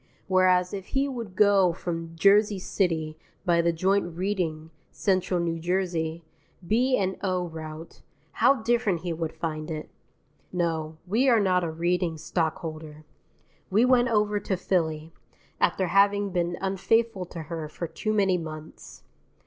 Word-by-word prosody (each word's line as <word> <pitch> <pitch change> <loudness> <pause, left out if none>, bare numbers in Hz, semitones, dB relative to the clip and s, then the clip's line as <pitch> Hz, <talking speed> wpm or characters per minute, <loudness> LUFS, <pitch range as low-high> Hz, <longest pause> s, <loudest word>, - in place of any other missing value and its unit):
Whereas 185 -1 +3
if 195 -1 -5
he 275 +1 +2
would 230 -8 -6
go 200 -4 +4
from 165 -1 -5
Jersey 200 +4 +4
City 160 -5 -1 0.3
by 170 -2 +3
the 170 0 +2
joint 175 0 0
Reading 170 -5 -2 0.2
Central 185 -2 0
New 165 -1 -1
Jersey 170 -2 -1 0.4
B.&O. 195 -6 +1
route, 160 0 -9 0.3
how 270 -4 +3
different 220 -7 +1
he 175 -1 -3
would 160 -1 -3
find 155 -1 -4
it. 155 -1 -6 0.6
No, 160 -3 -2
we 230 +9 +2
are 235 -3 +5
not 185 -3 +2
a 170 - -1
Reading 170 +1 -1
stockholder. 155 -1 -4 0.6
We 215 +6 +4
went 250 -1 +4
over 210 -3 +1
to 195 -1 -2
Philly, 160 -4 -1 0.5
after 190 - +2
having 200 +1 +3
been 175 -1 -1
unfaithful 195 +1 +1
to 170 -2 -7
her 155 -1 -5
for 170 - -5
too 215 +6 -3
many 195 -4 +2
months. 155 -1 -9
180 Hz, 140 wpm, -26 LUFS, 165-200 Hz, 0.6 s, are